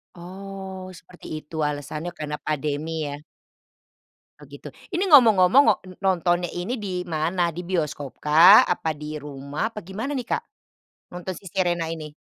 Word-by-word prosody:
Oh, 190 Hz, +1 st, -8 dB
seperti 180 Hz, 0 st, -15 dB, 0.2 s
itu 160 Hz, -, -12 dB
alasannya 150 Hz, +3 st, -5 dB
karena 150 Hz, -1 st, -4 dB
pandemi 150 Hz, +1 st, -2 dB, 0.2 s
ya. 145 Hz, +1 st, -6 dB, 1.2 s
Oh -, -, -14 dB
gitu, -, -, -10 dB, 0.3 s
ini 360 Hz, +3 st, +1 dB
ngomong-ngomong 230 Hz, -, +7 dB
wak 205 Hz, -, +3 dB
e -, -, -10 dB
nontonnya 175 Hz, -2 st, +1 dB
ini 195 Hz, +8 st, -3 dB
di 200 Hz, -, -4 dB, 0.2 s
mana, 165 Hz, +4 st, 0 dB
di 180 Hz, -, -4 dB
bioskop 150 Hz, -6 st, -2 dB
kah, 165 Hz, +7 st, +8 dB
apa 165 Hz, -2 st, -1 dB
di 150 Hz, -, -7 dB, 0.2 s
rumah, 140 Hz, 0 st, -6 dB
apa -, -, -5 dB
gimana 225 Hz, +9 st, -4 dB
nih 245 Hz, -, -4 dB
Kak, -, -, +1 dB, 0.7 s
nonton 180 Hz, +1 st, -5 dB
Si -, -, -23 dB
Sherina 175 Hz, -3 st, 0 dB
ini? 155 Hz, -2 st, -7 dB
175 Hz, 150 wpm, -24 LUFS, 150-190 Hz, 1.2 s, kah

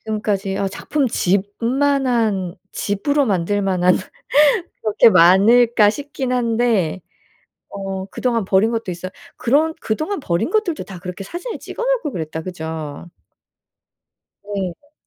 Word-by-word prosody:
지금까지 205 Hz, -3 st, -2 dB
'어 195 Hz, -1 st, 0 dB
작품집만한 230 Hz, -, 0 dB, 0.2 s
집으로 280 Hz, +8 st, 0 dB
만들 200 Hz, 0 st, 0 dB
만한 180 Hz, -2 st, +3 dB, 0.9 s
그렇게 215 Hz, +1 st, +5 dB
많을까?' 210 Hz, +6 st, +6 dB
싶긴 275 Hz, 0 st, -4 dB
한데 230 Hz, -7 st, +1 dB, 0.7 s
어 195 Hz, -1 st, -5 dB
그동안 230 Hz, +1 st, -1 dB
버린 195 Hz, +3 st, +3 dB
것도 230 Hz, -4 st, -3 dB
있어요. 180 Hz, +1 st, -6 dB, 0.3 s
그런 305 Hz, +6 st, +2 dB
그동안 310 Hz, -, -2 dB
버린 175 Hz, -, -1 dB
것들도 390 Hz, -6 st, 0 dB
다 190 Hz, -3 st, -9 dB
그렇게 180 Hz, +2 st, -7 dB
사진을 365 Hz, -, -6 dB
찍어 -, -, -7 dB
놓을 -, -, +1 dB
걸 295 Hz, -4 st, -3 dB
그랬다, 160 Hz, -1 st, -4 dB
그죠? 160 Hz, -3 st, -6 dB, 1.4 s
네. 200 Hz, -, -5 dB
210 Hz, 265 characters per minute, -20 LUFS, 185-255 Hz, 1.4 s, 많을까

